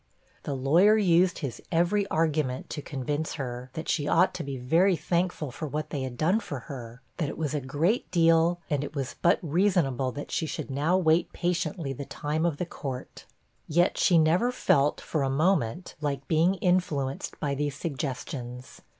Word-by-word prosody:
The 140 - -3
lawyer 170 +11 +5
used 180 -2 +3
his 140 -6 -5
every 180 +4 +2
argument 155 -6 0
to 150 - -4
convince 145 +3 -3
her, 125 -3 -5
that 160 - -6
she 145 -2 0
ought 175 +5 +4
to - - -4
be 140 -1 -5
very 165 +10 +3
thankful 170 -2 -1
for 155 +5 -5
what 150 +1 -4
they 140 - -2
had 130 -2 -5
done 180 - +2
for 140 - -6
her; 120 -1 -9
that 155 -5 -1
it - - -7
was 155 -2 -2
a 150 - -1
great 155 - 0
deal, 165 0 +4
and 145 -3 0
it 145 - -7
was 135 -2 -3
but 170 - +4
reasonable 160 -6 +1
that 145 - -7
she 160 - -1
should 145 - -5
now 150 +7 +2
wait 165 -2 +2
patiently 170 -4 -2
the 140 +2 -6
time 155 +5 -1
of 155 -4 -2
the 180 - -2
court. 135 -6 -7 0.4
Yet 175 +4 +2
she 175 - +4
never 170 +10 +3
felt, 145 - +2
for 155 - -2
a 135 - +1
moment, 160 +1 +1
like 140 -2 -2
being 165 +4 +3
influenced 170 -7 -1
by 145 -2 -1
these 145 0 -2
suggestions. 130 -4 -5
155 Hz, 185 wpm, -27 LUFS, 135-175 Hz, 0.4 s, lawyer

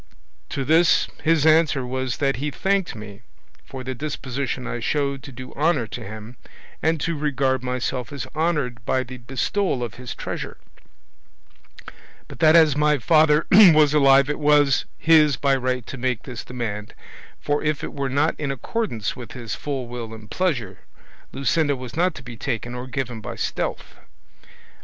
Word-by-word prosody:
To 135 - -3
this 165 +3 +4 0.2
his 160 -2 +3
answer 155 -4 +4
was 130 -1 -3
that 135 -2 0
he 145 +3 -2
thanked 195 +3 -1
me 105 -1 -10 0.4
for 130 -1 -8
the 130 0 -4
disposition 135 -2 -4
I 120 - -4
showed 140 +2 -1
to 135 - -10
do 130 +1 -9
honour 150 -5 +1
to 110 - -7
him 110 +4 -9 0.4
and 160 +1 +1
to 170 - -1
regard 135 -3 0
myself 125 0 -3
as 140 -2 -5
honoured 150 -7 -1
by 130 +1 0
the 130 +1 -9
bestowal 135 - -1
of 115 - -5
his 125 - -6
treasure; - - -5 1.7
but - - -12
that 155 0 +6
as 160 -4 +6
my 150 0 +3
father 155 +3 +4
was 155 -7 +7
alive 140 -2 +5
it 150 - -2
was 145 -2 +4
his 150 -4 +5
by 140 +1 +2
right 125 -2 -2
to 135 - -8
make 125 -2 -1
this 125 -3 -7
demand, 110 -4 -5 0.4
for 145 0 -1
if 150 -2 -1
it - - -5
were 140 -1 -2
not 145 +4 +2
in 145 -2 -2
accordance 135 - -3
with 120 -3 -9
his 120 -4 -6
full 135 -4 -4
will 120 -2 -6
and 110 -1 -14
pleasure, 125 - -1 0.5
Luscinda 145 +1 +1
was 125 -2 -8
not 180 +1 +1
to 125 - -10
be 120 -1 -9
taken 120 0 -4
or 125 +1 -6
given 125 -3 -4
by 105 - -6
stealth. - - -4
135 Hz, 170 wpm, -23 LUFS, 125-150 Hz, 1.7 s, was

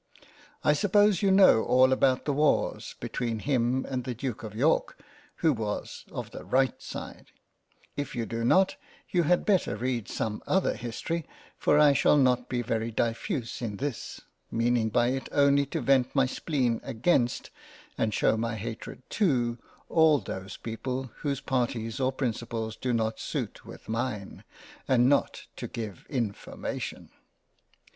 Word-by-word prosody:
I 150 - +5
suppose 205 +3 +3
you 200 - +3
know 190 - +6
all 130 +1 +5
about 130 -1 +2
the 145 - +1
Wars 150 +1 +1
between 115 -2 -2
him 125 +1 0
and 130 -2 -2
the 125 0 -4
Duke 125 -1 -4
of 105 -1 -8
York 145 +8 +1 0.5
who 160 - +5
was 110 -4 -4
of - - -6
the - - -8
right 130 -1 +1
side; - - -8 0.7
if 145 -1 -4
you 120 -1 -1
do 115 0 -3
not, 190 +11 +3 0.3
you 180 - +3
had 175 +2 +2
better 195 - +2
read 120 -1 -2
some 105 -1 -3
other 190 0 +2
History, 135 +7 -4 0.3
for 145 - +3
I 150 -1 +6
shall 140 +3 +4
not 125 -2 +2
be 120 -1 -1
very 115 0 -1
diffuse 115 +2 -2
in 105 -4 -3
this, 140 -1 -4 0.3
meaning 115 -1 +1
by 120 +2 +2
it 135 +1 -3
only 140 0 +4
to 160 +2 -3
vent 130 0 +2
my 135 -1 +4
spleen 130 -3 -1
against, 125 0 0 0.4
and 110 - 0
shew - - +2
my 115 0 -2
Hatred 115 +3 -7 0.2
to 120 - +2 0.3
all 160 -2 +5
those 95 -7 -6
people 125 +3 -4
whose 140 -2 -2
parties 120 -3 -1
or 130 0 +2
principles 115 -3 -3
do 130 - -2
not 110 -1 0
suit - - -4
with - - -11
mine, 115 -3 -3 0.4
and 125 -2 +4
not 140 +1 +1
to - - -5
give 110 -6 -7
information. 115 -7 -4
125 Hz, 155 wpm, -28 LUFS, 115-140 Hz, 0.7 s, know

